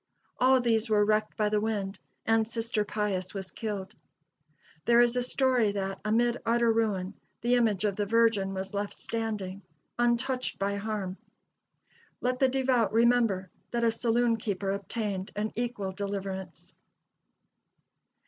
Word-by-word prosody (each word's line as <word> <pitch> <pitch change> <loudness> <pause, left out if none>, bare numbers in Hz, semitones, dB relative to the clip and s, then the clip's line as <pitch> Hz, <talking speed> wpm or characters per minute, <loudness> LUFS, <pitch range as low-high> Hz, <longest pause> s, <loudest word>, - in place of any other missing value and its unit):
All 260 +1 +5
these 230 -2 +1
were 210 -1 +4
wrecked 215 0 +1
by 210 -2 +2
the 210 0 +1
wind, 205 -3 -2 0.3
and 225 -1 +3
Sister 230 -1 -1
Pius 205 -3 -2
was 190 -1 -5
killed. 205 -3 -4 0.9
There 235 0 +5
is 240 0 +4
a 250 - +2
story 250 -3 +2
that, 195 -1 -3
amid 235 +3 +1
utter 235 0 +3
ruin, 205 -5 0 0.3
the 240 +1 +2
image 220 -5 +2
of 200 -2 0
the 205 -1 0
Virgin 225 -3 +3
was 190 +1 -5
left 205 0 -3
standing, 210 -4 -4 0.4
untouched 245 +2 +1
by 200 +1 -1
harm. 200 -3 -3 1.0
Let 250 0 -1
the 265 - +4
devout 255 -5 +2
remember 225 -5 +3 0.2
that 235 -1 -1
a 230 - +4
saloon 230 0 +2
keeper 200 -3 -2
obtained 200 -1 -3
an 210 +1 -1
equal 230 -5 -2
deliverance. 195 -1 -5
215 Hz, 140 wpm, -29 LUFS, 200-235 Hz, 1.0 s, All